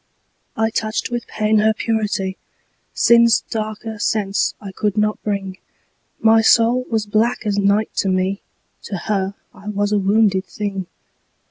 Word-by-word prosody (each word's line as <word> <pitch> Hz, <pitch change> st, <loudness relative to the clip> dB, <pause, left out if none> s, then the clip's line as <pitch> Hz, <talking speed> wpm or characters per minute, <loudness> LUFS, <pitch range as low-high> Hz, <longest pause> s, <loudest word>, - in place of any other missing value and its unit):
I 220 Hz, 0 st, +1 dB
touched 220 Hz, +2 st, -2 dB
with 240 Hz, -1 st, -3 dB
pain 215 Hz, 0 st, +1 dB
her 215 Hz, +1 st, +3 dB
purity; 210 Hz, -4 st, -1 dB, 0.6 s
Sin's 235 Hz, -1 st, +5 dB
darker 215 Hz, 0 st, -4 dB
sense 205 Hz, -1 st, 0 dB
I 200 Hz, -2 st, -8 dB
could 205 Hz, +1 st, -2 dB
not 210 Hz, 0 st, 0 dB
bring: 195 Hz, -2 st, -4 dB, 0.6 s
My 225 Hz, 0 st, +5 dB
soul 235 Hz, +3 st, +3 dB
was 220 Hz, -2 st, 0 dB
black 220 Hz, +4 st, 0 dB
as 205 Hz, -1 st, 0 dB
night 200 Hz, +2 st, +1 dB
to 195 Hz, -, +1 dB
me: 185 Hz, +1 st, 0 dB, 0.4 s
To 200 Hz, -, -4 dB
her 195 Hz, +1 st, -2 dB, 0.2 s
I 200 Hz, -, -14 dB
was 205 Hz, 0 st, -1 dB
a 210 Hz, -, +2 dB
wounded 195 Hz, -1 st, +2 dB
thing. 195 Hz, -3 st, -4 dB
210 Hz, 145 wpm, -19 LUFS, 200-220 Hz, 0.6 s, Sin's